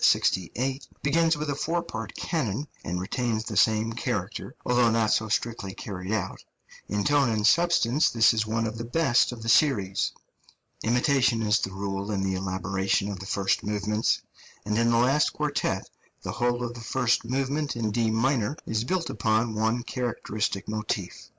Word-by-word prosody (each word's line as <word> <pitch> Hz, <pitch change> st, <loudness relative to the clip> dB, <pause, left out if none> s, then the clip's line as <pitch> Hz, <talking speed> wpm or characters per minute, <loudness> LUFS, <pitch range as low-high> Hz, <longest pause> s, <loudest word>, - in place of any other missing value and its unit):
begins 165 Hz, +2 st, +3 dB
with 150 Hz, +1 st, -3 dB
a 145 Hz, -, 0 dB
four 165 Hz, +4 st, -1 dB
part 110 Hz, -1 st, -6 dB
canon 140 Hz, -, -2 dB, 0.2 s
and 90 Hz, +1 st, -3 dB
retains 110 Hz, +3 st, -1 dB
the -, -, -5 dB
same 110 Hz, 0 st, +3 dB
character, 110 Hz, -6 st, -3 dB
although 125 Hz, -1 st, +4 dB
not 110 Hz, -1 st, +2 dB
so 110 Hz, -, +2 dB
strictly 110 Hz, -3 st, -2 dB
carried 95 Hz, -1 st, -6 dB
out; 105 Hz, -4 st, -2 dB, 0.5 s
in 105 Hz, +1 st, 0 dB
tone 145 Hz, -3 st, +3 dB
and 110 Hz, -2 st, 0 dB
substance 155 Hz, -3 st, +4 dB
this 115 Hz, -1 st, +5 dB
is 110 Hz, -1 st, +1 dB
one 110 Hz, +1 st, -1 dB
of 110 Hz, 0 st, -4 dB
the -, -, -3 dB
best 120 Hz, 0 st, +2 dB
of 115 Hz, -2 st, -8 dB
the -, -, -6 dB
series. 105 Hz, -8 st, +3 dB, 0.7 s
Imitation 120 Hz, 0 st, +2 dB
is 105 Hz, 0 st, +3 dB
the 95 Hz, -, -3 dB
rule 95 Hz, +1 st, -4 dB
in 100 Hz, -2 st, -1 dB
the 95 Hz, 0 st, 0 dB
elaboration 95 Hz, +1 st, -1 dB
of 95 Hz, -, -6 dB
the 95 Hz, -, -8 dB
first 100 Hz, 0 st, 0 dB
movements; 105 Hz, +1 st, 0 dB, 0.4 s
and 105 Hz, +1 st, -1 dB
in 115 Hz, 0 st, +3 dB
the 115 Hz, -, +3 dB
last 135 Hz, +5 st, +3 dB
quartet 145 Hz, -10 st, -1 dB, 0.4 s
the -, -, -3 dB
whole 120 Hz, 0 st, 0 dB
of 120 Hz, 0 st, -3 dB
the 120 Hz, -, -9 dB
first 115 Hz, +2 st, +1 dB
movement 135 Hz, +3 st, -1 dB
in 110 Hz, -2 st, -1 dB
D 115 Hz, +1 st, +1 dB
minor 120 Hz, +3 st, +1 dB
is 110 Hz, 0 st, -1 dB
built 175 Hz, +5 st, -1 dB
upon 110 Hz, +1 st, 0 dB
one 110 Hz, +3 st, 0 dB
characteristic 110 Hz, -5 st, -3 dB
motif. 105 Hz, -3 st, -4 dB
115 Hz, 170 wpm, -27 LUFS, 105-125 Hz, 0.7 s, this